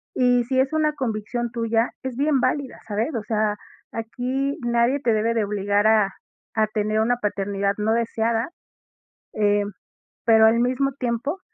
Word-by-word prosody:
Y 245 Hz, -1 st, +3 dB
si 260 Hz, +2 st, 0 dB
es 265 Hz, +1 st, +2 dB
una 310 Hz, -1 st, +2 dB
convicción 240 Hz, -2 st, -3 dB
tuya, 230 Hz, 0 st, 0 dB
es 260 Hz, -2 st, -4 dB
bien 285 Hz, 0 st, +2 dB
válida, 255 Hz, +1 st, -1 dB
¿sabes? 215 Hz, +4 st, -1 dB
O 225 Hz, -, -2 dB
sea, 215 Hz, -1 st, 0 dB, 0.3 s
aquí 255 Hz, +5 st, -2 dB
nadie 235 Hz, +3 st, +2 dB
te 235 Hz, -3 st, +2 dB
debe 220 Hz, +2 st, +1 dB
de 225 Hz, -2 st, +1 dB
obligar 205 Hz, +1 st, +1 dB
a 215 Hz, -3 st, +3 dB, 0.4 s
a 220 Hz, -1 st, +3 dB
tener 215 Hz, 0 st, -1 dB
una 240 Hz, +3 st, +2 dB
paternidad 200 Hz, -2 st, -1 dB
no 215 Hz, +1 st, +1 dB
deseada, 230 Hz, +1 st, 0 dB, 0.8 s
em, 205 Hz, -1 st, +1 dB, 0.5 s
pero, 220 Hz, -1 st, +6 dB
al 225 Hz, +1 st, +3 dB
mismo 255 Hz, +3 st, +1 dB
tiempo 250 Hz, +8 st, -2 dB
230 Hz, 155 wpm, -23 LUFS, 215-250 Hz, 0.8 s, pero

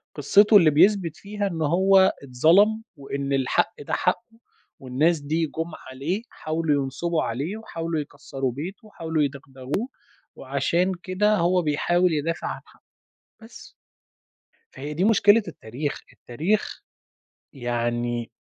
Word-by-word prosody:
قصتُه 205 Hz, +9 st, +5 dB
اللي 170 Hz, -5 st, +6 dB
بيثبت 175 Hz, 0 st, +3 dB
فيها 205 Hz, 0 st, -3 dB
إن 165 Hz, -4 st, -4 dB
هو 190 Hz, +5 st, +4 dB
اتظلم، 175 Hz, -, +3 dB
وإن 140 Hz, 0 st, -4 dB
الحق 135 Hz, -2 st, +1 dB
ده -, -, -6 dB
حقُّه، 225 Hz, +5 st, -1 dB, 0.4 s
والناس 145 Hz, +6 st, +1 dB
دي 155 Hz, +3 st, -1 dB
جُم 165 Hz, +3 st, -5 dB, 0.2 s
عليه، 150 Hz, +11 st, -3 dB
حاولوا 155 Hz, -3 st, -1 dB
ينصبوا 155 Hz, +5 st, -2 dB
عليه 140 Hz, -, -3 dB
وحاولوا 165 Hz, -7 st, -4 dB
يكسّروا 135 Hz, -2 st, -5 dB
بيته، 180 Hz, -, -7 dB
وحاولوا 160 Hz, -6 st, -2 dB
يدغدغوه 140 Hz, -, -4 dB, 0.5 s
وعشان 140 Hz, +7 st, 0 dB
كده 210 Hz, +3 st, +2 dB
هو 180 Hz, +2 st, +2 dB
بيحاول 175 Hz, +3 st, +1 dB
يدافع 155 Hz, +2 st, -2 dB
عن -, -, -5 dB
حقُّه، -, -, -23 dB, 0.6 s
بس. 225 Hz, +1 st, -13 dB, 1.0 s
فهي 145 Hz, +2 st, -6 dB
دي 170 Hz, +5 st, -1 dB
مشكلة 210 Hz, +1 st, +5 dB
التاريخ، 140 Hz, -1 st, -5 dB
التاريخ 165 Hz, -, -2 dB, 0.7 s
يعني 120 Hz, -2 st, -2 dB
160 Hz, 120 wpm, -24 LUFS, 140-190 Hz, 1.0 s, اللي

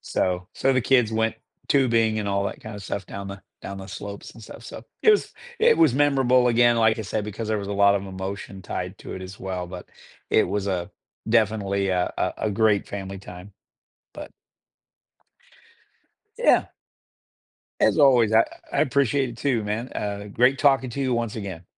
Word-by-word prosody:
So 90 Hz, 0 st, -2 dB
so 135 Hz, 0 st, +2 dB
the 130 Hz, -, +2 dB
kids 120 Hz, -3 st, +3 dB
went 110 Hz, 0 st, +1 dB, 0.3 s
tubing 115 Hz, -5 st, +2 dB
and 105 Hz, -, -3 dB
all 100 Hz, 0 st, 0 dB
that -, -, -5 dB
kind 110 Hz, -1 st, -8 dB
of 100 Hz, -, -8 dB
stuff 95 Hz, +1 st, -4 dB
down 100 Hz, +1 st, -7 dB
the 100 Hz, 0 st, -9 dB, 0.2 s
down 100 Hz, -, -7 dB
the 95 Hz, +1 st, -9 dB
slopes 100 Hz, +1 st, -8 dB
and 115 Hz, -, -14 dB
stuff, -, -, -11 dB
so -, -, -9 dB, 0.2 s
it 435 Hz, -, +7 dB
was 420 Hz, -, +2 dB, 0.3 s
it 460 Hz, +1 st, +5 dB
was 330 Hz, -, +5 dB
memorable 135 Hz, -3 st, +3 dB
again, 120 Hz, 0 st, +4 dB
like 110 Hz, 0 st, +3 dB
I -, -, -2 dB
said, 105 Hz, +1 st, -3 dB
because 110 Hz, +1 st, -5 dB
there 110 Hz, -1 st, 0 dB
was 100 Hz, 0 st, -5 dB
a -, -, -2 dB
lot 100 Hz, 0 st, +4 dB
of 100 Hz, 0 st, -5 dB
emotion 95 Hz, 0 st, -6 dB
tied -, -, -5 dB
to -, -, -9 dB
it 95 Hz, -, -7 dB
as 95 Hz, +2 st, -9 dB
well, 90 Hz, -2 st, -4 dB
but 90 Hz, 0 st, -9 dB, 0.4 s
it -, -, +4 dB
was 100 Hz, 0 st, -2 dB
a 90 Hz, -2 st, -2 dB, 0.4 s
definitely 100 Hz, -3 st, +1 dB
a 90 Hz, -1 st, 0 dB
a -, -, 0 dB
a 110 Hz, -, +1 dB
great 110 Hz, -2 st, +2 dB
family 95 Hz, -1 st, -6 dB
time. 90 Hz, +1 st, -11 dB, 0.6 s
But -, -, -9 dB, 2.1 s
Yeah. -, -, +4 dB, 1.2 s
As -, -, +3 dB
always, 125 Hz, -6 st, +5 dB
I 110 Hz, -, +7 dB, 0.3 s
I -, -, -1 dB
I -, -, +4 dB
appreciate 135 Hz, -1 st, +1 dB
it 115 Hz, -, -10 dB
too, 125 Hz, -6 st, 0 dB
man, 110 Hz, +5 st, -3 dB
uh, 100 Hz, 0 st, -4 dB
great 125 Hz, +3 st, +3 dB
talking 135 Hz, -3 st, +3 dB
to 140 Hz, -, -5 dB
you 130 Hz, -2 st, 0 dB
once 115 Hz, -2 st, -2 dB
again. 95 Hz, -5 st, -6 dB
105 Hz, 195 wpm, -24 LUFS, 100-120 Hz, 2.1 s, it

